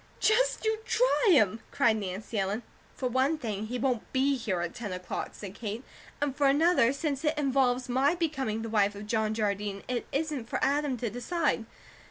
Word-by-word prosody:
"Just 480 Hz, +2 st, +2 dB
you 440 Hz, 0 st, +1 dB
try -, -, +2 dB
him!" 220 Hz, -, +4 dB
cried 230 Hz, -2 st, +3 dB
Nancy 200 Hz, +2 st, -4 dB
Ellen. 200 Hz, +4 st, -1 dB, 0.3 s
"For 255 Hz, -, -2 dB
one 260 Hz, +5 st, +2 dB
thing, 215 Hz, -6 st, -4 dB
he 250 Hz, +3 st, -3 dB
won't 250 Hz, -3 st, -1 dB
be 275 Hz, +1 st, +2 dB
here 205 Hz, -8 st, -2 dB
at 175 Hz, -1 st, -3 dB
ten 210 Hz, -5 st, -5 dB
o'clock," 180 Hz, 0 st, -4 dB
said 195 Hz, -2 st, -8 dB
Kate, 220 Hz, +2 st, -5 dB, 0.4 s
"and 285 Hz, -2 st, -1 dB
for 285 Hz, -1 st, +3 dB
another, 290 Hz, -3 st, +4 dB
since 280 Hz, 0 st, -2 dB
it 305 Hz, 0 st, +1 dB
involves 260 Hz, -3 st, +2 dB
my 265 Hz, +6 st, +2 dB
becoming 270 Hz, -10 st, -1 dB
the 225 Hz, -, -4 dB
wife 205 Hz, -2 st, +2 dB
of 205 Hz, +1 st, -7 dB
John 220 Hz, 0 st, 0 dB
Jardine, 205 Hz, -2 st, -2 dB
it 250 Hz, -2 st, -2 dB
isn't 285 Hz, -5 st, -2 dB
for -, -, -1 dB
Adam 285 Hz, -2 st, +1 dB
to 235 Hz, -2 st, -3 dB
decide. 250 Hz, -, -1 dB
250 Hz, 190 wpm, -29 LUFS, 215-290 Hz, 0.4 s, him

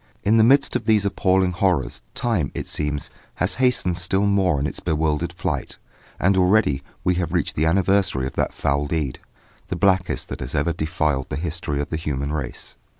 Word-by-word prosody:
In 110 Hz, +3 st, +4 dB
the 110 Hz, -, +6 dB
midst 135 Hz, +4 st, +4 dB
of 125 Hz, -, -1 dB
these 110 Hz, -3 st, +3 dB
appalling 95 Hz, -1 st, +2 dB
horrors, 90 Hz, -9 st, 0 dB
time, 105 Hz, -, 0 dB
it -, -, -3 dB
seems, 75 Hz, -1 st, -2 dB, 0.2 s
has 90 Hz, +4 st, 0 dB
hastened 90 Hz, -9 st, +2 dB
still 95 Hz, +4 st, +1 dB
more 95 Hz, -7 st, +2 dB
in 70 Hz, -, -1 dB
its 70 Hz, -, -3 dB
bewildered 80 Hz, -2 st, 0 dB
flight, -, -, -4 dB, 0.4 s
and 95 Hz, +2 st, +3 dB
already 90 Hz, -7 st, +3 dB, 0.2 s
we 90 Hz, -, +2 dB
have 85 Hz, -, -3 dB
reached -, -, 0 dB
the 80 Hz, +2 st, +1 dB
anniversary 95 Hz, -6 st, +2 dB
of 65 Hz, -, -4 dB
that -, -, 0 dB
foul 70 Hz, +1 st, -1 dB
deed, 75 Hz, -4 st, -2 dB, 0.5 s
the -, -, -3 dB
blackest 95 Hz, -1 st, +1 dB
that -, -, -5 dB
has 65 Hz, +4 st, -5 dB
ever 80 Hz, +3 st, +1 dB
defiled 75 Hz, -4 st, -1 dB
the -, -, -3 dB
history 80 Hz, -2 st, -3 dB
of 70 Hz, -, -3 dB
the 80 Hz, -, -1 dB
human 70 Hz, -2 st, -3 dB
race. 70 Hz, -4 st, -5 dB
85 Hz, 190 wpm, -22 LUFS, 75-95 Hz, 0.5 s, the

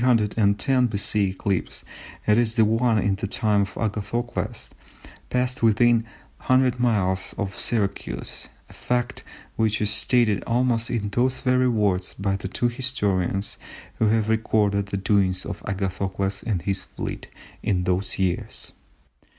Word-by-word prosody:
eclipse, 105 Hz, -3 st, +1 dB, 0.4 s
that 105 Hz, -, +4 dB
is 115 Hz, -1 st, +2 dB
the 110 Hz, -2 st, +5 dB
one 115 Hz, +1 st, +2 dB
in 100 Hz, -1 st, +2 dB
the 100 Hz, -, -3 dB
time 105 Hz, 0 st, +1 dB
of 100 Hz, -2 st, -4 dB
Agathocles, 110 Hz, +2 st, -3 dB, 0.6 s
passed 125 Hz, 0 st, 0 dB
within 115 Hz, +1 st, +5 dB, 0.4 s
100 130 Hz, -1 st, +2 dB
miles 95 Hz, -6 st, +1 dB
of 100 Hz, -1 st, -3 dB
Syracuse, 100 Hz, -, -2 dB, 0.2 s
a -, -, -16 dB
fact 125 Hz, +1 st, -2 dB, 0.4 s
which 110 Hz, -1 st, +1 dB
is 105 Hz, -1 st, +2 dB
stated 110 Hz, -2 st, +2 dB
almost 120 Hz, -1 st, +1 dB
in 105 Hz, -4 st, -1 dB
those 125 Hz, +4 st, 0 dB
very 130 Hz, -1 st, +3 dB
words 100 Hz, -5 st, 0 dB
by 95 Hz, 0 st, -1 dB
the 95 Hz, -1 st, -4 dB
two 120 Hz, +5 st, 0 dB
historians 105 Hz, -6 st, -1 dB, 0.4 s
who 110 Hz, -, +3 dB
have 110 Hz, 0 st, +2 dB
recorded 105 Hz, -2 st, +1 dB
the 95 Hz, -, -3 dB
doings 95 Hz, -2 st, +1 dB
of -, -, -6 dB
Agathocles 95 Hz, 0 st, -2 dB
and 95 Hz, -7 st, -2 dB
his 100 Hz, -1 st, -1 dB
fleet -, -, -6 dB, 0.3 s
in 90 Hz, -3 st, 0 dB
those 90 Hz, +2 st, 0 dB
years. 95 Hz, -2 st, -2 dB
105 Hz, 135 wpm, -24 LUFS, 100-120 Hz, 0.6 s, the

